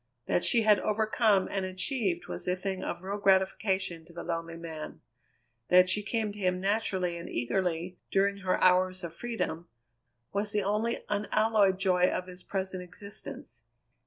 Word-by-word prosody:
That 175 - +1
she 230 -2 +4
had 210 -1 +5
overcome 215 -2 +2
and 195 -1 -1
achieved 185 - -1
was - - -6
a 180 - +2
thing 190 0 -4
of 175 +1 -4
real 200 +2 -3
gratification 190 -3 +2
to 170 - -16
the 170 - -6
lonely 165 -1 -3
man; 160 -2 -7 0.7
that 180 0 +6
she 210 - +1
came 215 0 -1
to 205 - -10
him 180 -2 +1
naturally 190 -3 0
and 170 - -7
eagerly, 175 +6 -1
during 200 +1 +2
her 190 -2 0
hours 185 0 +4
of 165 -1 -6
freedom, 200 -8 -3 0.7
was 205 +1 -1
the 210 -1 +1
only 215 +4 0
unalloyed 210 -1 +2
joy 180 -2 +3
of 180 - -2
his 180 0 -10
present 190 -1 -3
existence. 180 - -7
190 Hz, 160 wpm, -30 LUFS, 180-205 Hz, 0.7 s, that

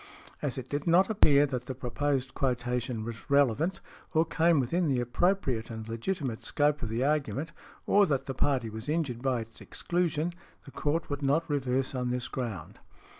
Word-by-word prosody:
As 145 -2 -2
it 130 -1 -5
did 145 +4 -3
not 185 +5 +5
appear 145 -9 +5
that 130 -4 -4
the 130 - -4
proposed 135 +1 -1
quotation 125 -2 -1
was 115 +4 -7
relevant 140 - +2 0.3
or 160 +1 +5
came 165 -2 +3
within 165 +7 +1
the 135 -3 +2
appropriate 125 - 0
and 110 -1 -6
legitimate 115 +1 -3
scope 150 0 +1
of 115 - -3
the 115 +3 0
argument, 150 +1 0 0.3
or 205 -1 +5
that 135 -3 0
the 135 - -3
party 130 -3 +1
was 110 +4 -6
injured 145 -7 -1
by 130 -3 +1
its 110 0 -10
exclusion, 175 -1 -1 0.3
the 140 - -11
Court 155 +4 -1
would 145 0 -2
not 145 +4 +2
reverse 135 -2 0
on 125 -1 -1
this 125 0 -2
ground. 110 - -5
135 Hz, 175 wpm, -29 LUFS, 125-150 Hz, 0.3 s, not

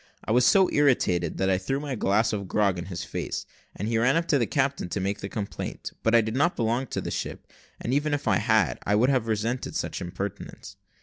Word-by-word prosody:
I - - -2
was 125 +2 +5
so 190 -2 +6
irritated, 95 - +2
that 95 0 +1
I 95 - +2
threw 135 +9 -2
my 145 -2 -4
glass 110 -1 +1
of 100 -2 -3
grog 100 -2 +1
in 85 - -5
his 90 -3 -5
face, - - -4 0.3
and 105 - -3
he 115 0 +1
ran 130 +5 +3
up 165 0 +1
to 145 - +4
the 115 - +1
captain 135 - 0
to 100 - -2
make 100 +2 -2
the 100 - -5
complaint: 100 -1 -5
but 110 +1 +3
I 115 - +7
did 110 +1 -3
not 145 +6 +2
belong 120 +3 0
to - - -3
the - - -4
ship, - - -4 0.3
and 120 - -2
even 145 +2 +1
if 145 0 -2
I - - +4
had, 110 0 +2
I 105 - +1
would 120 +5 +4
have 125 -4 +1
resented 115 +3 -2
such - - -3
impertinence. 95 +3 -6
110 Hz, 240 wpm, -26 LUFS, 100-135 Hz, 0.3 s, I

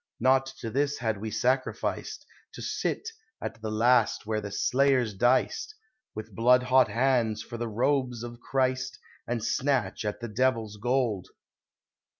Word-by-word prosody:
Not 130 +1 +3
to 115 - -4
this 140 +3 0
had 110 -4 -1
we 110 - -3
sacrificed: 125 +4 -1 0.3
To - - -9
sit 450 - -2 0.3
at 115 - -6
the 110 - -3
last 115 +1 +3
where 110 0 -1
the 100 -1 -6
slayers 130 -1 +2
diced, 130 - +1 0.4
With 110 -1 -7
blood 125 +3 +5
hot 130 0 +5
hands 115 -1 +1
for 120 - -8
the 120 -1 -2
robes 125 +1 0
of 120 0 -8
Christ, 130 0 -1 0.3
And 120 -2 -2
snatch 120 -5 0
at 105 -1 -3
the 120 - -5
Devil's 115 -2 0
gold. 120 -4 0
120 Hz, 150 wpm, -28 LUFS, 110-130 Hz, 0.4 s, blood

